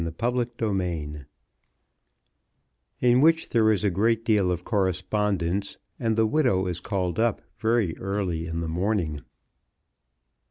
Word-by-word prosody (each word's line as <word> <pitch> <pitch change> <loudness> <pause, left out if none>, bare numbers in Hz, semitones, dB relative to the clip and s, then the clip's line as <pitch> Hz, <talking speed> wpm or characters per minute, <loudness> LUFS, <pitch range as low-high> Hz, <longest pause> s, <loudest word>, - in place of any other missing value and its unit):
Chapter 120 +10 -1
XLVIII 85 - -2 1.8
In 125 +1 +4
which 165 +1 +3
there 110 -2 +4
is 105 -1 0
a 100 - +2
great 115 +5 +1
deal 105 -5 +3
of 90 0 -3
correspondence, 100 -1 -1 0.2
and 115 -3 0
the 110 0 +3
widow 110 -6 +2
is 90 -2 -2
called 90 -2 -2
up 115 -2 +1 0.2
very 110 -6 +1
early 95 -4 -2
in 85 0 -3
the 85 - -3
morning. 85 -3 -1
100 Hz, 125 wpm, -25 LUFS, 85-115 Hz, 1.8 s, In